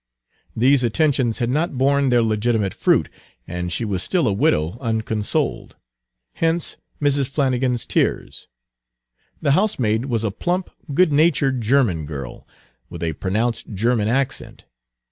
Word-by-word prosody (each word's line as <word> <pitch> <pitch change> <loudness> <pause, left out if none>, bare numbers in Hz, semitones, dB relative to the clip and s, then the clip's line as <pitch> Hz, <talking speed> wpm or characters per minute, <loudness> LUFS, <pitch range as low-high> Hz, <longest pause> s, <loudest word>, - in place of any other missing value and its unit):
These 130 +3 +3
attentions 125 -1 +1
had 120 -1 -1
not 150 0 -1
borne 140 +1 +2
their 120 -2 +3
legitimate 110 -2 0
fruit, - - +2 0.4
and 90 0 -4
she 115 - -2
was 95 -4 -2
still 175 -8 +1
a 105 - +2
widow 85 +1 +1
unconsoled, 110 -3 -2 0.6
hence 165 0 -1 0.2
Mrs. 145 -2 +1
Flannigan's 130 -3 0
tears. - - -1 1.0
The 145 - +3
housemaid 130 - +1
was 115 -4 -1
a 110 - 0
plump, 180 - -2 0.2
good 160 +2 +3
natured 140 -4 +2
German 110 - +1
girl, 70 -5 -8 0.4
with - - -7
a 80 -1 -1
pronounced 110 +6 -2
German 110 +1 +1
accent. 135 +3 -2
120 Hz, 130 wpm, -21 LUFS, 105-140 Hz, 1.0 s, These